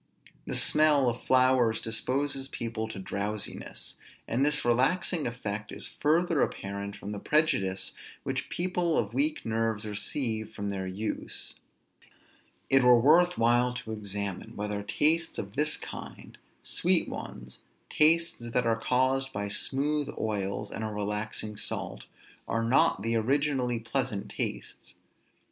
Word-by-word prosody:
The - - -2
smell 150 -3 +5
of 120 - -4
flowers 130 -3 +4
disposes 135 +4 -1
people 115 -4 -4
to 110 - -8
drowsiness; 100 +2 -4 0.3
and 125 +4 +1
this 150 -2 +2
relaxing 140 +7 +2
effect 110 -3 -4
is - - -3
further 165 +1 +3
apparent 100 0 -3
from 100 - -7
the 105 - -4
prejudice 135 - +2 0.3
which - - -3
people 175 -2 0
of 110 0 0
weak 150 +4 +1
nerves 115 -1 -1
receive 110 +1 -2
from 100 -1 -3
their 95 -1 -3
use. 100 +4 -4 1.1
It 135 0 +5
were 125 -1 +7
worth 170 +7 +5
while 120 +2 +3
to 110 - -6
examine, 100 -3 -4
whether 105 0 -3
tastes 155 +11 +1
of 100 0 -5
this 150 +2 +1
kind, - - -9 0.3
sweet - - +3
ones, 60 +1 -7 0.3
tastes 165 +2 +3
that 120 +1 -1
are 115 -1 +1
caused 130 +2 +1
by 100 -3 -3
smooth 145 +7 0
oils 100 -2 -2
and 110 - -4
a - - -1
relaxing 105 0 -3
salt, - - -4 0.4
are 115 0 0
not 115 -4 +3
the 115 +1 0
originally 130 0 +1
pleasant 115 -3 -2
tastes. - - -5
115 Hz, 135 wpm, -29 LUFS, 105-140 Hz, 1.1 s, were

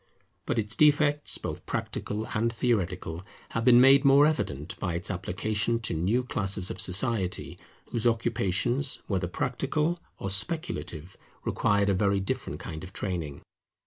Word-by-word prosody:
But - - 0
its 105 -1 0
defects, 150 -1 +3
both - - -6
practical 105 +2 -3
and 115 +2 +1
theoretical, 95 -7 -1 0.3
have 115 - -2
been 120 0 +7
made 135 +2 +7
more 140 +1 +7
evident 75 - -1
by 85 -3 -2
its 85 +4 -3
application 105 +5 -1
to 110 - -3
new 95 +10 +1
classes 100 -5 -1
of - - -1
society, 95 0 0 0.3
whose 120 0 +1
occupations, 115 +3 +1
whether 95 -3 -1
practical 145 - -1 0.2
or 95 - -3
speculative, 95 - -3 0.3
required 100 0 +2
a - - +3
very 100 +1 +2
different 95 - -3
kind 80 +1 -7
of 95 0 -10
training. 85 -7 -4
105 Hz, 145 wpm, -28 LUFS, 90-125 Hz, 0.3 s, been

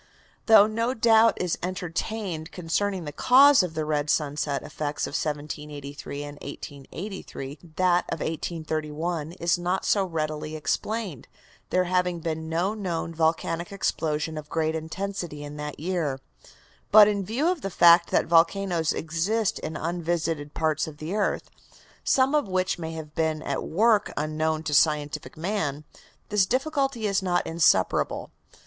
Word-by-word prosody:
Though 220 -2 +8
no 230 +4 -1
doubt 225 -1 +5
is 180 -2 -1
entertained 180 -1 -4
concerning 185 +1 -2
the 150 - -5
cause 265 - +6
of 175 -3 -4
the 155 -1 -1
red 150 -1 -1
sunset 145 -2 0
effects 150 0 -3
of - - -6
1783 145 -1 -5
and 145 0 -9
1883, 145 -1 -7 0.2
that 180 -1 +3
of 165 - -2
1831 160 0 -3
is 170 0 0
not 180 +2 -1
so 200 - +3
readily 155 -3 -3
explained, 190 - -3 0.4
there 185 - +2
having 180 -1 0
been 160 -1 -4
no 175 +5 0
known 175 -5 -3
volcanic 165 +3 0
explosion 155 -5 -1
of 150 0 -11
great 160 0 0
intensity 160 -1 -4
in 145 0 -8
that 150 0 -6
year. 160 -5 -1 0.7
But 210 0 +9
in 205 -2 0
view 235 - -1
of 360 -4 -1
the 195 - -3
fact 170 -1 +6
that - - +2
volcanoes 170 0 +2
exist 180 +7 -1
in 155 +1 -5
unvisited 165 -3 -2
parts 155 -1 0
of 150 -2 -9
the 155 +4 -5
earth, 210 -1 -1 0.5
some 265 +1 +3
of 300 -7 +2
which 185 -1 0
may 165 -1 -5
have 155 -2 -8
been 160 -1 -1
at - - -2
work 210 +4 +2
unknown 155 +1 -1
to 155 -2 -3
scientific 150 +1 +1
man, 160 -5 -2 0.5
this 205 -2 +3
difficulty 270 -1 0
is 200 -1 +1
not 180 -2 0
insuperable. 160 - +2
165 Hz, 145 wpm, -26 LUFS, 155-195 Hz, 0.7 s, But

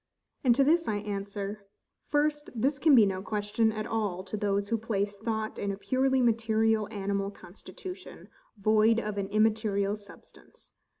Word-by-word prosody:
And 245 -3 +5
to 275 - +4
this 330 +4 +3
I 215 - 0
answer: 200 0 -5 0.4
First, 295 0 0
This 270 +5 0
can 305 -1 +6
be 225 -4 +7
no 190 -1 -2
question 210 +2 0
at 215 0 -4
all 205 -5 -2
to 195 - -6
those 200 -1 -1
who 230 - 0
place 205 -2 -2
thought 220 0 -3
in 200 - -1
a 195 - -5
purely 260 +4 +1
material 225 -2 +2
animal 200 -1 -2
constitution, 215 - -10 0.3
void 215 +2 +4
of 210 -3 -3
an 195 - -2
immaterial 210 -1 +1
substance. 205 -1 -16
215 Hz, 160 wpm, -29 LUFS, 200-230 Hz, 0.4 s, be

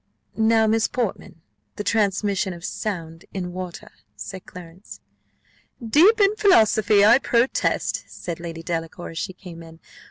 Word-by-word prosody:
"Now, 220 0 +3
Miss 220 0 +2
Portman, 215 -8 -4 0.3
the 205 - -5
transmission 200 -2 0
of 170 +1 -9
sound 165 -6 -5
in 180 -2 -4
water," 180 -1 -7 0.2
said 185 - -9
Clarence 180 +2 -12 0.8
"Deep 315 - +4
in 400 +1 +4
philosophy, 220 - +4
I 235 +4 +6
protest!" 240 -1 0
said 170 -2 -7
Lady 165 -1 -7
Delacour, 165 0 -5
as 165 - -6
she 185 - -4
came 180 -3 -11
in. 165 0 -14
195 Hz, 135 wpm, -23 LUFS, 170-225 Hz, 0.8 s, I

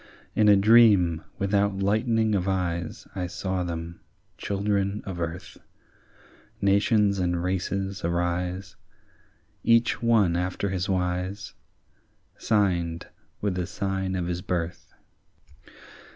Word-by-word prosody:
In 105 -1 +4
a 100 - +8
dream 100 -6 +5 0.2
without 100 0 +1
lightening 110 +2 +1
of 95 -2 0
eyes 85 -3 -2
I 90 -2 -2
saw 95 +1 -3
them, 85 0 -5 0.4
children 100 0 -1
of 90 -3 -5
earth, 85 +3 -6 1.0
Nations 100 0 +3
and 90 -1 0
races 95 +1 -2
arise, 90 +2 -2 0.9
Each 115 0 +3
one 110 -7 +3
after 90 +3 -2
his 95 0 -2
wise, 90 +1 -2 0.8
Signed 85 -6 0 0.3
with 100 -2 0
the 90 -1 -3
sign 95 -1 -2
of 90 -2 -2
his 90 0 -3
birth. 85 -3 -4
95 Hz, 110 wpm, -26 LUFS, 90-100 Hz, 1.0 s, a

